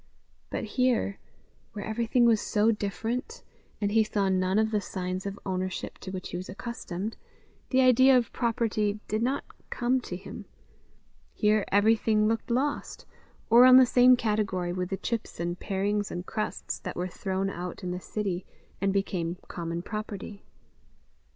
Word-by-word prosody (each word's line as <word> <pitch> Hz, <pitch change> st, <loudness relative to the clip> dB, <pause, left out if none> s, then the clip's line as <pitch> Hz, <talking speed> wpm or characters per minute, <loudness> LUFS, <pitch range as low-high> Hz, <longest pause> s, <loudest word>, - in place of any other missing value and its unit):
But -, -, -3 dB
here, 235 Hz, -2 st, 0 dB, 0.5 s
where 205 Hz, -2 st, -5 dB
everything 235 Hz, +2 st, +2 dB
was 225 Hz, -2 st, +4 dB
so 215 Hz, +2 st, +2 dB
different, 230 Hz, -, -3 dB, 0.4 s
and 205 Hz, -1 st, 0 dB
he 220 Hz, +1 st, +4 dB
saw 205 Hz, -2 st, 0 dB
none 185 Hz, +1 st, +1 dB
of 220 Hz, 0 st, +2 dB
the 210 Hz, -2 st, +1 dB
signs 185 Hz, 0 st, -4 dB
of 200 Hz, 0 st, -5 dB
ownership 185 Hz, -1 st, -3 dB
to 190 Hz, -, -8 dB
which 185 Hz, -1 st, -5 dB
he -, -, -4 dB
was 185 Hz, -, -7 dB
accustomed, 205 Hz, -1 st, -5 dB, 0.5 s
the 260 Hz, 0 st, +4 dB
idea 260 Hz, +1 st, +6 dB
of 240 Hz, -, -1 dB
property 215 Hz, -3 st, 0 dB
did 215 Hz, +1 st, -1 dB
not 260 Hz, +4 st, 0 dB, 0.3 s
come 250 Hz, +1 st, +1 dB
to 180 Hz, -, -6 dB
him; 185 Hz, -, -9 dB, 0.9 s
here 210 Hz, -1 st, +2 dB
everything 215 Hz, +1 st, +3 dB
looked 225 Hz, +2 st, -1 dB
lost, 265 Hz, +5 st, -1 dB, 0.5 s
or 235 Hz, +2 st, +9 dB
on 255 Hz, 0 st, +9 dB
the 260 Hz, -, +8 dB
same 250 Hz, +1 st, +6 dB
category 205 Hz, -6 st, -1 dB
with 180 Hz, 0 st, -3 dB
the 195 Hz, -, -2 dB
chips 230 Hz, -4 st, -4 dB
and 175 Hz, +1 st, -2 dB
parings 205 Hz, +1 st, -1 dB
and 175 Hz, +1 st, -5 dB
crusts 215 Hz, -, -3 dB
that 185 Hz, -, -6 dB
were 180 Hz, +1 st, -2 dB
thrown 190 Hz, +1 st, -2 dB
out 180 Hz, +2 st, -6 dB
in 180 Hz, -, -2 dB
the 180 Hz, -, -3 dB
city, 190 Hz, -2 st, -3 dB, 0.4 s
and 195 Hz, 0 st, +2 dB
became 180 Hz, -3 st, -1 dB
common 170 Hz, 0 st, -4 dB
property. 210 Hz, -1 st, -6 dB
210 Hz, 160 wpm, -28 LUFS, 185-230 Hz, 0.9 s, or